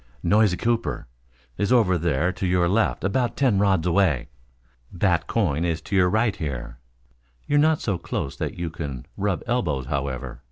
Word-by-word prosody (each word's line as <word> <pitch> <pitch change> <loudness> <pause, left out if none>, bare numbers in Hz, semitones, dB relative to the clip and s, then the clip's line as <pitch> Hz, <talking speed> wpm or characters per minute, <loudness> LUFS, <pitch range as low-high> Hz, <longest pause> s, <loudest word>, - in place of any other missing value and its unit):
"Noisy 105 -4 +3
Cooper 115 0 -1 0.5
is 100 - 0
over 110 -8 +4
there 85 0 +1
to 95 - -3
your 90 -1 +2
left 105 +5 +1
about 120 +5 0
ten 125 -8 +3
rods 95 -4 +2
away. 85 -9 +2 0.6
Bat 85 -2 +1
Coyne 85 -9 0
is 85 -2 0
to 100 - -4
your 90 -1 +4
right 110 +2 +1
here. 65 -5 -5 0.7
You're 145 - +2
not 155 +1 +3
so 100 -6 -1
close 70 - -4
that - - -3
you 85 -2 -3
can 70 -7 -6
rub 100 -2 -1
elbows, 85 - -1
however. 65 -2 -4
90 Hz, 165 wpm, -24 LUFS, 80-105 Hz, 0.7 s, over